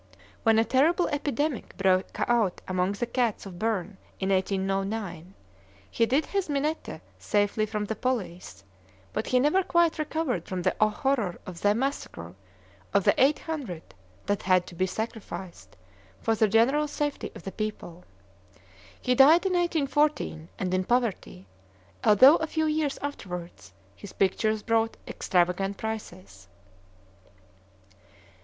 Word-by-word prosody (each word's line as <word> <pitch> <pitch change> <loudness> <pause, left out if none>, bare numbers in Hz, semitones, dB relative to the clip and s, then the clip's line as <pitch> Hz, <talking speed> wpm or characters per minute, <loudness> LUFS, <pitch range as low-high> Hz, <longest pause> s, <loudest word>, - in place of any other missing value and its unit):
When 225 -1 +4
a 225 - +4
terrible 315 +9 +3
epidemic 290 -2 -2
broke 190 -1 +1
out 230 -6 +1
among 185 +1 0
the 220 +4 -2
cats 240 -3 -1
of 180 -3 -9
Berne 210 -3 -2 0.2
in 190 - -1
1809, 195 -1 -2 0.6
he 230 - +2
hid 280 +5 +2
his 395 -4 -2
Minette 295 +3 -2 0.2
safely 205 +1 +1
from 210 -1 -3
the 220 - -3
police, 185 - -4 0.5
but 215 - -2
he 255 - +3
never 300 +9 +3
quite 340 -2 +2
recovered 300 - -2
from 185 -1 -3
the - - +2
horror 215 -2 +1
of 175 -2 -9
the 205 0 +3
massacre 235 - -4 0.6
of 200 - +4
the - - +5
eight 285 +3 +4
hundred 265 - -6 0.3
that 205 0 0
had 185 -1 +3
to - - -11
be 185 +2 0
sacrificed 190 - -7 0.4
for 225 - +1
the 220 0 +3
general 250 +8 +3
safety 290 0 -3
of - - -10
the 195 - -5
people. 185 -4 -5 1.0
He 250 - +1
died 300 +8 +6
in 380 - +1
1814, 295 - 0
and 185 -1 -2
in 185 0 +1
poverty, 220 - -1 0.6
although 260 +9 +7
a 320 - -2
few 315 0 -1
years 305 -2 0
afterward 180 -11 -5 0.4
his 200 - -11
pictures 215 +2 +1
brought 225 0 +1
extravagant 185 +2 0
prices. 100 - -7
220 Hz, 135 wpm, -27 LUFS, 185-275 Hz, 1.0 s, although